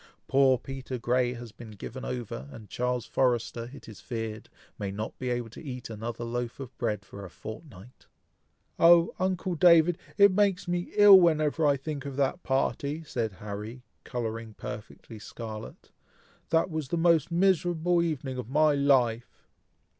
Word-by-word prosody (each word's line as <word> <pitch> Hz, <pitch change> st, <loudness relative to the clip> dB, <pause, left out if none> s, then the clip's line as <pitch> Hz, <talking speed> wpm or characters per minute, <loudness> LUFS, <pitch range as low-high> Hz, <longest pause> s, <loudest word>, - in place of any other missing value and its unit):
Poor 135 Hz, -1 st, +4 dB
Peter 135 Hz, 0 st, -6 dB
Grey 125 Hz, +1 st, +1 dB
has 120 Hz, -2 st, -9 dB
been 115 Hz, +1 st, -12 dB
given 110 Hz, +5 st, -8 dB
over, 110 Hz, -, -5 dB
and 105 Hz, +4 st, -12 dB
Charles 125 Hz, -1 st, -1 dB
Forrester, 120 Hz, -2 st, 0 dB
it 140 Hz, -, -12 dB
is 110 Hz, -4 st, -11 dB
feared, 115 Hz, -2 st, -5 dB, 0.3 s
may 100 Hz, -, -3 dB
not 105 Hz, +3 st, -5 dB
be 130 Hz, -, -3 dB
able 120 Hz, -2 st, -2 dB
to -, -, -11 dB
eat 125 Hz, -5 st, -7 dB
another 115 Hz, +2 st, -5 dB
loaf 120 Hz, +1 st, -4 dB
of 130 Hz, -2 st, -8 dB
bread 105 Hz, -5 st, -2 dB
for 100 Hz, +1 st, -10 dB
a 95 Hz, -, -8 dB
fortnight!" 110 Hz, -, -11 dB, 0.7 s
"Oh! 170 Hz, 0 st, +6 dB
uncle 185 Hz, 0 st, -1 dB
David! 170 Hz, 0 st, +5 dB, 0.2 s
it 200 Hz, -1 st, +7 dB
makes 195 Hz, -2 st, +1 dB
me 175 Hz, 0 st, -2 dB
ill 205 Hz, -2 st, +9 dB
whenever 155 Hz, -2 st, +2 dB
I 140 Hz, -1 st, +3 dB
think 140 Hz, 0 st, -5 dB
of 140 Hz, -, -6 dB
that 140 Hz, +6 st, 0 dB
party!" 140 Hz, +3 st, -1 dB
said 115 Hz, -8 st, -3 dB
Harry, 105 Hz, +5 st, -7 dB, 0.2 s
colouring 115 Hz, -3 st, -5 dB
perfectly 105 Hz, +1 st, -9 dB
scarlet; 110 Hz, +1 st, -9 dB, 0.6 s
"that 165 Hz, +2 st, +2 dB
was 155 Hz, -3 st, -3 dB
the 170 Hz, -, -2 dB
most 165 Hz, -2 st, +3 dB
miserable 175 Hz, -1 st, +2 dB
evening 140 Hz, -6 st, -3 dB
of 125 Hz, -, -6 dB
my 150 Hz, +2 st, +4 dB
life!" 130 Hz, -5 st, +1 dB
130 Hz, 160 wpm, -28 LUFS, 115-160 Hz, 0.7 s, ill